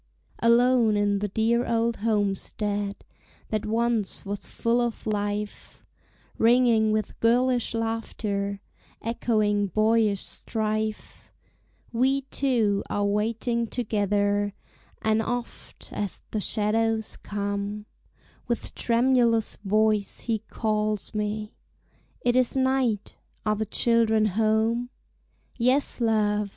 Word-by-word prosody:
Alone 235 -2 +4
in 205 -1 +1
the 205 - -1
dear 225 +4 +1
old 230 0 +1
homestead 205 -1 -1 0.5
That 215 -1 -2
once 225 -3 0
was 200 +1 -5
full 235 +1 0
of 235 -2 -3
life, 205 -1 -3 0.5
Ringing 230 -2 +4
with 215 -2 -2
girlish 245 +1 +2
laughter, 210 -3 -2 0.4
Echoing 215 -3 +1
boyish 215 +1 +2
strife, 215 -1 -3 0.6
We 265 +4 +2
two 225 -7 +1
are 205 0 0
waiting 230 +3 0
together; 205 -3 0 0.5
And 220 0 +2
oft, 245 +2 -6
as 205 -3 -3
the 215 - -1
shadows 220 +1 0
come, 205 +1 -4 0.6
With 235 - -3
tremulous 235 -2 +2
voice 215 0 +1
he 225 -2 -1
calls 215 -1 -2
me, 210 0 -3 0.7
"It 245 0 +1
is 255 +1 +3
night! 260 -5 0 0.3
are 215 0 +2
the 215 0 -3
children 225 -1 +3
home?" 220 +3 +1 0.7
"Yes, 255 +2 +2
love!" 210 -2 +1
220 Hz, 100 wpm, -26 LUFS, 205-235 Hz, 0.7 s, Alone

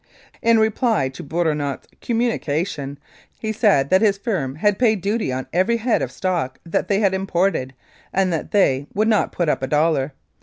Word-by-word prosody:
In 230 0 +4
reply 220 - +1
to 130 - -10
Bourinot's 150 -3 -1 0.2
communication, 160 - -1 0.4
he 220 - -3
said 200 - +2
that 190 +1 +5
his 205 -3 +3
firm 180 - -2
had 205 +5 +1
paid 220 -4 +3
duty 205 - -1
on 130 0 -3
every 190 +7 +2
head 230 +1 +1
of - - -3
stock 175 -9 -2
that 170 - -1
they 200 +1 +1
had 195 -2 +3
imported, 185 -8 0 0.4
and 190 -2 +1
that 160 - -3
they 140 -9 +2
"would 215 +2 +2
not 215 -2 +2
put 175 - -1
up 150 - +1
a 130 - -1
dollar." 150 -1 +1
185 Hz, 180 wpm, -21 LUFS, 145-215 Hz, 0.4 s, that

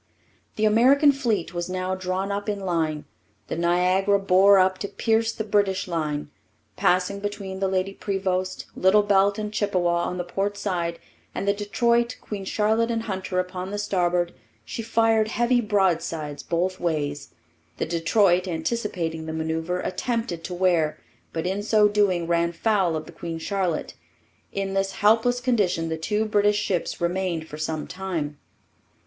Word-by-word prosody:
The 215 - +1
American 260 +7 +5
fleet 230 -11 -1
was 175 0 -3
now 185 0 -2
drawn 185 +1 -2
up 205 +1 -3
in 205 -1 -2
line. 160 -5 -1 0.4
The - - -2
Niagara 180 +4 +2
bore 195 +1 +5
up 185 0 +3
to 200 - -3
pierce 225 +2 +1
the 220 - -4
British 200 -3 +1
line. 150 -4 -2 0.4
Passing 185 +2 +1
between 200 -2 -5
the 195 - +1
Lady 190 +1 -1
Prevost, 185 -2 -2
Little 195 +3 +4
Belt, 200 0 +3
and 210 0 -4
Chippewa 175 -5 +1
on 180 - -3
the 175 - -2
port 195 +3 -2
side 175 -4 -2 0.4
and 195 - -3
the 200 - +4
Detroit, 235 +4 +1
Queen 200 -2 -6
Charlotte, 220 +3 +1
and 225 -1 -1
Hunter 190 -3 -4
upon 180 0 -4
the 205 - -4
starboard, 175 -4 0 0.3
she - - -5
fired 225 -1 +2
heavy 240 +2 +2
broadsides 170 -8 0
both 180 +2 -1
ways. 150 -4 -2 0.4
The - - -1
Detroit, 175 +2 +2
anticipating 165 -3 -2
the 160 - -4
manoeuvre, 160 +3 -2
attempted 225 -4 -2
to 180 - -5
wear, 175 -4 +2 0.3
but 160 0 -3
in 190 +3 -1
so 210 0 +4
doing 200 -4 +2
ran 170 0 +1
foul 190 -2 +1
of 155 - -4
the - - -11
Queen 165 -1 -6
Charlotte. 180 -1 -2 0.6
In 195 -1 -3
this 195 0 0
helpless 225 +4 +3
condition 205 -10 +1
the 160 - -1
two 210 +7 0
British 205 -1 +2
ships 190 -4 -1
remained 175 -2 -1
for 150 - -9
some 155 -1 -2
time. 170 -6 -4
190 Hz, 160 wpm, -24 LUFS, 170-205 Hz, 0.6 s, American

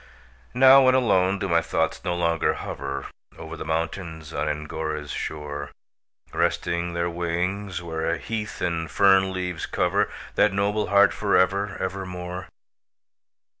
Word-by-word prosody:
Now, 135 +1 +8
when 130 0 +5
alone, 100 -6 +3
do 100 - -2
my 85 -2 +3
thoughts - - -1
no 90 - -1
longer 85 -1 +1
hover 70 0 -5 0.3
Over - - -8
the - - -6
mountains 80 0 -3
on 75 +1 -1
Angora's 75 0 -4
shore, 75 -2 -5 0.6
Resting 85 0 0
their 85 0 0
wings, 90 +2 -2
where 80 0 -2
heath 110 -2 -5
and 85 -3 -1
fern 95 +4 +4
leaves 90 -3 -3
cover - - +1 0.2
That 105 - +3
noble 100 +2 0
heart 100 0 +5
for 100 -1 +2
ever, 100 +1 +1
ever 95 0 -3
more? 90 0 -6
90 Hz, 135 wpm, -25 LUFS, 80-100 Hz, 0.6 s, Now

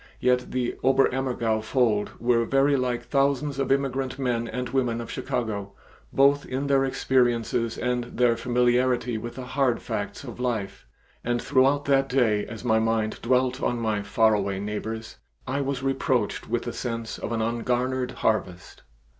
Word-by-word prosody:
Yet 125 0 +1
the 125 -1 -2
Oberammergau 130 -4 +2
fold 110 -3 0
were 120 0 +2
very 135 +4 +3
like 125 -2 -1
thousands 140 +2 0
of 135 -1 0
immigrant 135 -1 0
men 120 -3 -1
and 125 +2 -3
women 125 -4 0
of 115 - -6
Chicago, 100 -4 -3 0.4
both 140 +1 +4
in 130 +2 -3
their 135 -1 +3
experiences 120 -3 +1
and 125 0 -1
in - - -13
their 120 -2 +3
familiarity 125 0 +1
with 120 +2 -7
the 130 - -6
hard 130 -2 +1
facts 100 +3 -4
of 120 -3 -9
life, 110 - -3 0.4
and 120 0 0
throughout 140 +3 +2
that 135 -1 +2
day 115 -6 +2
as 115 0 -8
my 110 -2 +3
mind 110 -1 0
dwelt 125 +1 +1
on 120 - 0
my 110 -3 -1
far 110 +3 +3
away 100 -2 -1
neighbors, 110 +2 -5 0.3
I 135 +2 -1
was 135 -1 -2
reproached 130 -6 0
with 120 +1 0
the 120 - -4
sense 115 -2 -4
of - - -4
an 115 -1 0
ungarnered 125 +2 -1
harvest. 110 -7 -2
125 Hz, 165 wpm, -25 LUFS, 115-130 Hz, 0.4 s, both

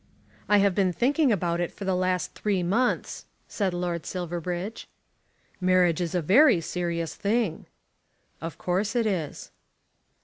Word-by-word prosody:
"I 210 - +6
have 200 -1 +3
been 190 -1 +2
thinking 275 - +2
about 175 -4 0
it 175 - -1
for 200 - -8
the 190 - +1
last 185 0 0
three 200 -4 -1
months," 225 +9 0 0.2
said 195 -3 -1
Lord 175 -2 -3
Silverbridge. 175 +3 -4 0.7
"Marriage 180 -2 +3
is 175 0 -2
a 175 - 0
very 215 - +6
serious 170 0 -3
thing." 205 -5 -1 0.7
"Of 165 -1 -6
course 195 +5 -1
it 235 -2 +2
is." 180 -8 -3
185 Hz, 140 wpm, -26 LUFS, 175-205 Hz, 0.7 s, I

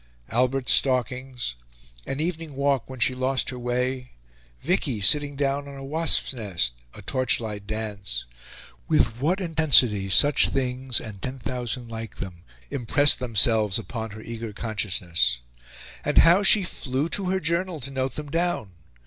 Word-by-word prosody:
Albert's 125 +2 +1
stalkings 125 - +1 0.5
an 135 - -3
evening 160 -2 -3
walk 140 -3 0
when 130 -1 -9
she 130 - +3
lost 130 +1 -1
her 125 - -7
way 125 +1 -3 0.5
Vicky 120 -6 -1
sitting 145 +7 +5
down 140 0 -1
on 140 - -9
a 135 - -9
wasps' 160 0 +2
nest 95 - -1 0.2
a 105 - -11
torchlight 110 -4 0
dance 100 - -4 0.6
with 115 -1 +1
what 170 +8 0
intensity 140 - +2
such 145 +9 +4
things, 130 -1 -1
and 105 -4 -10
ten 130 +1 -5
thousand 125 -1 -5
like 115 0 -7
them, 90 -3 -8 0.3
impressed 145 +2 +4
themselves 110 -4 +3
upon 115 0 -6
her 110 +1 -10
eager 115 -1 -6
consciousness! 90 - -1 0.6
And - - -2
how 175 +4 +6
she 205 0 +6
flew 135 -4 -2
to 195 +2 -2
her 190 0 0
journal 170 0 -1
to 140 +3 -5
note 130 0 -2
them 150 -2 -7
down! 170 - -1
125 Hz, 150 wpm, -24 LUFS, 110-140 Hz, 0.6 s, how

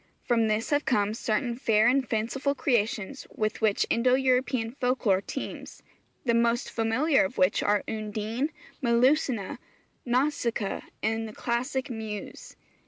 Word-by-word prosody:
From 230 -2 +2
this 215 +7 -1
have 290 0 +2
come 210 -6 +1
certain 230 +2 -1
fair 220 -2 +3
and 260 0 +2
fanciful 260 +6 -1
creations 230 -1 -1
with 215 +1 -2
which 215 -2 +2
Indo 250 +2 +3
European 255 -3 +1
folk 255 -1 -1
lore 190 -2 +4
teems, 270 - -7 0.4
the 235 - +3
most 235 +2 +1
familiar 255 +7 +2
of 190 - -4
which 185 +2 +3
are 205 0 +2
Undine, 220 +5 -2 0.3
Melusina, 245 -3 +2 0.4
Nausicaa, 240 -5 0 0.2
and 225 +1 0
the 215 - -9
classic 255 +4 -2
Muse. 220 - -7
235 Hz, 135 wpm, -27 LUFS, 215-260 Hz, 0.4 s, lore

